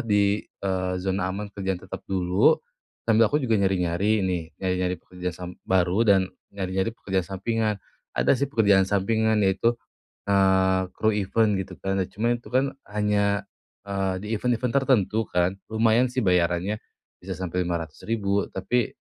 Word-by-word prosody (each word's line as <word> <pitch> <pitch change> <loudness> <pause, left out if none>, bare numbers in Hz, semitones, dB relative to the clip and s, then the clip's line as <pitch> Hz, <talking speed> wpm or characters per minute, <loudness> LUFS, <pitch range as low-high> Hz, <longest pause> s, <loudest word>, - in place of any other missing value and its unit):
di, 105 -2 +2
eee, 95 -1 -3
zona 95 0 -1
aman 100 +2 -5
kerjaan 95 -2 -2
tetap 95 +1 -8
dulu, 90 0 +3 0.5
sambil 115 -1 +4
aku 150 - +1
juga 110 -4 +2
nyari-nyari 95 +2 +1
nih, 90 -3 0
nyari-nyari 90 -1 -1
pekerjaan 90 -2 -6
sam 90 -1 -6 0.2
baru 95 +2 +2
dan, 95 -2 +5 0.3
nyari-nyari 95 +1 -1
pekerjaan 95 -4 -1 0.2
sampingan. 110 +1 0 0.4
Ada - - +2
sih 140 - +1
pekerjaan 100 -6 +4
sampingan 110 +3 +1
yaitu, 95 +5 +2 0.5
eee, 95 -1 +3
kru 110 - +2
event 105 +1 +2
gitu 95 -1 -5
kan. 95 0 0
Nah 90 - -3
cuma 115 +4 -1
itu 120 - -23
kan, 135 +1 +3 0.2
hanya, 105 -1 +1 0.4
eee, 95 -1 -1
di - - -7
event-event 125 +1 0
tertentu 110 -4 +2
kan. 90 +2 0
Lumayan 110 +3 +3
sih 125 +1 -2
bayarannya, 90 +2 +1 0.4
bisa 95 +1 -6
sampai 90 0 -2
Rp500.000, 100 +5 -2
tapi, 110 +5 0
100 Hz, 150 wpm, -25 LUFS, 95-110 Hz, 0.5 s, dan